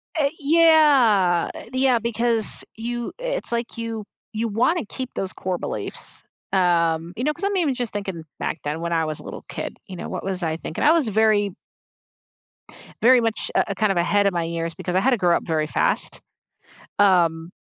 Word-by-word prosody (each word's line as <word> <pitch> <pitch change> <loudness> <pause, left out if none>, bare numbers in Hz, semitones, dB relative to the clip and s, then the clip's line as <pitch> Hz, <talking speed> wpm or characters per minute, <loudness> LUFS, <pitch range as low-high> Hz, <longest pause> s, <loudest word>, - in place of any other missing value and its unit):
Eh 285 -3 +2
yeah, 280 - +4
eh 230 - -10
yeah, 260 -2 +3
because 230 -1 0
you 240 +1 -4
it's - - -3
like 235 0 -3
you 225 -2 -4 0.3
you 225 +1 -2
wanna 235 - +1
keep 260 +1 -5
those 190 -1 -2
core 185 -1 -3
beliefs, - - -6 0.3
um, 170 -2 +2
you 245 - -4
know, 300 +1 +1
'cause 345 - -9
I'm 400 -1 +1
even 305 -7 +1
just 245 -3 -3
thinking 190 -5 -4 0.2
back - - -3
then 150 +2 -3
when 170 0 -2
I 165 -1 +1
was 155 -1 -3
a - - -11
little - - -8
kid, - - -5
you 185 - -8
know, - - -6
what - - -5
was 185 -2 -3
I 160 -1 0
thinking? 160 - -5
I 305 - +6
was 320 -8 +3
very 210 -2 +2 1.5
very 245 +1 +6
much, 225 -1 -1
uh, 200 - +2
kind 215 -1 +2
of 185 - -1
ahead 200 +4 +3
of 195 - +1
my 170 -1 0
years, 165 0 -3
because 180 -1 -4
I - - +5
had 265 +7 +2
to 245 - +3
grow 175 -3 +3
up - - -1
very 155 -2 0
fast. - - 0 0.8
Um, 170 -4 +3
210 Hz, 195 wpm, -23 LUFS, 175-250 Hz, 1.5 s, I